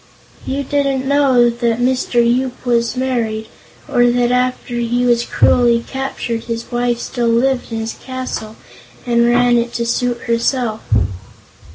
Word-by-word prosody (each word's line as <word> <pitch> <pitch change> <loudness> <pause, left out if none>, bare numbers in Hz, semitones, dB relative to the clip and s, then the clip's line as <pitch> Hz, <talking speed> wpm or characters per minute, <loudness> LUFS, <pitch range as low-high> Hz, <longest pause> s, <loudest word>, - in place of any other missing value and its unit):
"You 275 +1 -2
didn't 275 -1 0
know 265 -4 +4
that 235 -1 -1
Mr. 255 0 0
Yoop 250 +2 -1
was 235 0 +1
married, 230 -4 -1 0.4
or 245 0 +3
that 245 0 +1
after 250 -1 -1
he 240 +1 0
was 240 -1 +3
cruelly 235 -1 +3
captured 265 -4 -4
his 230 +1 -5
wife 240 0 0
still 240 0 -2
lived 245 +2 +1
in 225 - -3
his 225 0 -4
castle 255 -4 -6 0.5
and 235 -1 +3
ran 245 0 +4
it 235 0 -3
to 235 - -2
suit 240 0 -1
herself." 235 -1 -1
240 Hz, 145 wpm, -17 LUFS, 235-255 Hz, 0.5 s, know